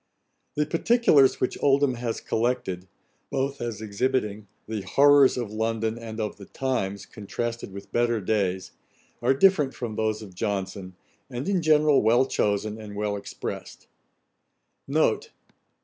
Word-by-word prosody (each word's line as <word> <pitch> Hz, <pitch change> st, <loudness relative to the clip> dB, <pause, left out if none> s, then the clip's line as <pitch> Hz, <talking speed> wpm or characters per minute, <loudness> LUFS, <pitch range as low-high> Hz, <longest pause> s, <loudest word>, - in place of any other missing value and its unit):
The 150 Hz, -, +1 dB
particulars 165 Hz, -, +4 dB
which 130 Hz, -, -2 dB
Oldham 140 Hz, -1 st, +3 dB
has 120 Hz, -1 st, -4 dB
collected, 110 Hz, -6 st, -1 dB, 0.4 s
both 135 Hz, +1 st, -2 dB
as 115 Hz, -3 st, -4 dB
exhibiting 105 Hz, -1 st, -1 dB, 0.2 s
the 110 Hz, -1 st, -3 dB
horrours 140 Hz, +7 st, +5 dB
of 120 Hz, -4 st, -3 dB
London, 110 Hz, +1 st, -1 dB
and 115 Hz, -1 st, -7 dB
of 105 Hz, -1 st, -3 dB
the 100 Hz, -2 st, -12 dB
times, 100 Hz, -7 st, -2 dB
contrasted 115 Hz, +2 st, -5 dB
with 100 Hz, +1 st, -10 dB
better 120 Hz, -1 st, +1 dB
days, 95 Hz, -2 st, -1 dB, 0.5 s
are 130 Hz, +3 st, +3 dB
different 150 Hz, -4 st, +4 dB
from 115 Hz, -4 st, -5 dB
those 110 Hz, 0 st, -1 dB
of 95 Hz, -3 st, -11 dB
Johnson, 95 Hz, 0 st, -3 dB, 0.3 s
and 125 Hz, +4 st, -5 dB
in 195 Hz, -3 st, +1 dB
general 155 Hz, -2 st, +4 dB
well 120 Hz, +4 st, +4 dB
chosen, 105 Hz, -2 st, -1 dB
and 105 Hz, -1 st, -9 dB
well 105 Hz, 0 st, -1 dB
exprest. 100 Hz, -, -7 dB
115 Hz, 135 wpm, -26 LUFS, 105-135 Hz, 0.5 s, horrours